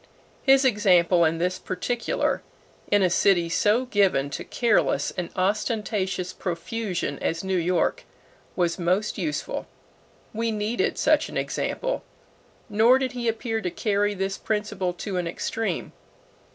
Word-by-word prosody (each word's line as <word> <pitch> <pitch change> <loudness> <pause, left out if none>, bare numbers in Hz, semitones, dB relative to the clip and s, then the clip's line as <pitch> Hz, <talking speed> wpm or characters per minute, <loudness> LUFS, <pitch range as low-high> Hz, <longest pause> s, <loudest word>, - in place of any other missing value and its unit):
His 270 0 +5
example 180 -7 +4
in 160 +1 +1
this 180 +2 -1
particular, 235 +6 -1 0.5
in 205 -1 +4
a 185 - +4
city 175 -2 +3
so 215 +8 +2
given 190 - +2
to - - -4
careless 235 -2 +1
and 180 -3 -4
ostentatious 195 -2 -1
profusion 180 - -3
as 165 +2 -2
New 190 0 -1
York, 175 0 0 0.5
was 175 -1 0
most 185 +4 0
useful. 305 - -3 0.7
We 230 +1 -1
needed 215 +2 -1
such - - +3
an - - -5
example. - - -2 0.6
Nor 225 +4 +5
did 265 -1 -1
he 245 -2 -4
appear 225 0 -1
to 180 - -1
carry 205 +2 0
this 195 0 -2
principle 210 -4 -1
to 185 +2 -4
an 175 -1 -1
extreme. 225 +6 -3
200 Hz, 135 wpm, -25 LUFS, 180-225 Hz, 0.7 s, His